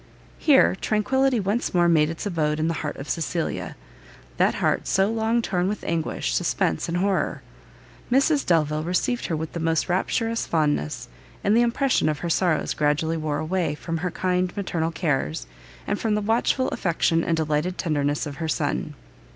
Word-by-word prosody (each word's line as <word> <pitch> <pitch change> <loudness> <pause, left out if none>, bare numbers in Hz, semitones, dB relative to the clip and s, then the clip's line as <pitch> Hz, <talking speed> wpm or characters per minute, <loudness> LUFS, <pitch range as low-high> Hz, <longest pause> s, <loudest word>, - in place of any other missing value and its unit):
Here 280 -4 +5
tranquility 255 +5 +1
once 205 +1 -1
more 175 -1 +4
made 155 -3 +4
its 165 +4 -5
abode 155 -6 0
the 160 +2 0
heart 150 - -3
of 140 - -7
Cecilia; 165 0 -2 0.6
that - - +3
heart - - 0
so 195 +2 +2
long 225 +1 +1
torn 180 -2 0
with 210 +2 -3
anguish, 165 -1 -2
suspense 80 - 0
and 170 - -1
horrour! 195 +1 0 0.7
Mrs 280 +3 +3
Delvile 155 -3 +1
received 180 +9 -1
her 165 - -1
with 160 0 -5
the 170 - -3
most 165 -1 +1
rapturous 225 +5 0
fondness, 150 - 0 0.4
and 205 +2 +3
the 235 - +5
impression 240 - +2
of 150 - -1
her 170 - 0
sorrows 175 -2 +1
gradually 150 +2 +1
wore 155 -2 -2
away, 160 0 -1
from 165 +2 -4
her 180 +3 -2
kind 180 +1 0
and 175 - -16
maternal 170 -5 -1
cares, 135 - -1 0.4
and 205 - -1
from 220 -2 0
the 210 - 0
watchful 230 +4 +1
affection 165 -1 +1
and 165 - 0
delighted 155 +3 -1
tenderness 145 -2 0
of 145 -2 -7
her 160 - -3
son. 150 -1 -2
170 Hz, 175 wpm, -24 LUFS, 155-205 Hz, 0.7 s, Here